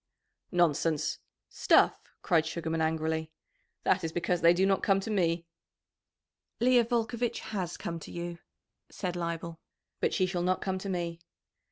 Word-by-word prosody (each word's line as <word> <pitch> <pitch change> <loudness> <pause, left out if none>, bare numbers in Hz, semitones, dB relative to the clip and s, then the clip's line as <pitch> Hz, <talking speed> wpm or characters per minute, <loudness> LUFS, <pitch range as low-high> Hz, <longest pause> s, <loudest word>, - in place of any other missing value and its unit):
"Nonsense! 165 -3 +1 0.3
Stuff!" - - +4 0.3
cried 160 -2 +3
Sugarman 160 0 -2
angrily. 160 0 0 0.5
"That - - +2
is 165 - -2
because 175 +1 0
they 170 +1 +7
do 180 +2 +3
not 195 0 +2
come 195 -2 +3
to 220 +3 -4
me." 170 -4 +1 1.1
"Leah 245 0 +5
Volcovitch 235 0 -1
has 180 -4 -2
come 170 -1 -4
to - - -10
you," 170 0 -5 0.5
said 180 -3 -4
Leibel, 170 -1 -4 0.4
"but - - +1
she 185 - +2
shall 180 -1 -2
not 185 +1 +1
come 190 -1 -2
to 195 - -5
me." 170 -2 -2
175 Hz, 150 wpm, -30 LUFS, 165-190 Hz, 1.1 s, they